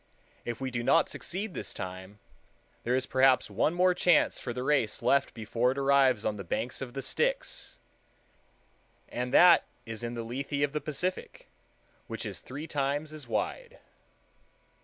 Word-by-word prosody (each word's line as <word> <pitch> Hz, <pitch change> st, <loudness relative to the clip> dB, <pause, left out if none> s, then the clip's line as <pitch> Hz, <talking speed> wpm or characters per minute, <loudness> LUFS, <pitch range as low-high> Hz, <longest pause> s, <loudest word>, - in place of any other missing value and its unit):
If 120 Hz, -1 st, -4 dB
we 130 Hz, -1 st, -3 dB
do 120 Hz, -1 st, -2 dB
not 140 Hz, +7 st, +3 dB
succeed 195 Hz, +2 st, -4 dB
this -, -, -6 dB
time, 95 Hz, +2 st, -7 dB, 0.7 s
there 120 Hz, +2 st, +1 dB
is 130 Hz, 0 st, +1 dB
perhaps 130 Hz, -4 st, +3 dB
one 135 Hz, -, +1 dB
more 180 Hz, +1 st, +4 dB
chance 175 Hz, -2 st, +3 dB
for 125 Hz, -, -4 dB
the 125 Hz, +1 st, -4 dB
race 130 Hz, -7 st, +1 dB
left 140 Hz, 0 st, +2 dB
before 115 Hz, +3 st, 0 dB
it -, -, -13 dB
arrives 135 Hz, -4 st, +3 dB
on 105 Hz, -1 st, -1 dB
the 100 Hz, -, -6 dB
banks 115 Hz, +9 st, -3 dB
of 130 Hz, -1 st, -6 dB
the 135 Hz, -, -3 dB
Styx; -, -, -1 dB, 1.3 s
and 125 Hz, +1 st, -3 dB
that 180 Hz, +5 st, +7 dB, 0.2 s
is 115 Hz, -1 st, -6 dB
in 120 Hz, 0 st, -4 dB
the 115 Hz, -, -4 dB
Lethe 140 Hz, +5 st, -3 dB
of 145 Hz, 0 st, 0 dB
the 150 Hz, -, -1 dB
Pacific, 155 Hz, +6 st, -4 dB, 0.6 s
which -, -, -5 dB
is -, -, -5 dB
three 145 Hz, +5 st, -7 dB
times 145 Hz, +1 st, -2 dB
as 155 Hz, -1 st, -8 dB
wide. -, -, -3 dB
135 Hz, 165 wpm, -29 LUFS, 120-150 Hz, 1.3 s, that